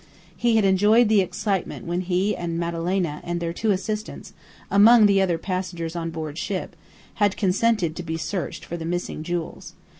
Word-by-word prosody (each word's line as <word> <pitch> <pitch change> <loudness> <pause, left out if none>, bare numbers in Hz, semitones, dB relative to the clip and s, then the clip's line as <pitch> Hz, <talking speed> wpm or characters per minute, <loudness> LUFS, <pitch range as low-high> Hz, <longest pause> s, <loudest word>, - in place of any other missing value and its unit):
He 235 -1 +1
had 220 -2 +3
enjoyed 210 +4 +4
the 215 -2 +5
excitement 190 +1 -3
when 175 +1 -1
he 185 +3 0
and 170 -1 -4
Madalena 170 -1 -2
and 175 0 -3
their 170 0 -3
two 220 +5 -2
assistants, 210 +2 -3 0.4
among 215 +2 +7
the 200 -1 +4
other 180 -3 +1
passengers 175 -2 -4
on 165 -1 -3
board 160 -1 -5
ship, 185 -3 -4 0.5
had 205 -1 +3
consented 195 -3 +1
to 175 - -5
be 160 -1 -4
searched 180 +2 -4
for 170 - -5
the 165 - -6
missing 175 -2 -3
jewels. 170 +1 -5
180 Hz, 175 wpm, -24 LUFS, 170-205 Hz, 0.5 s, among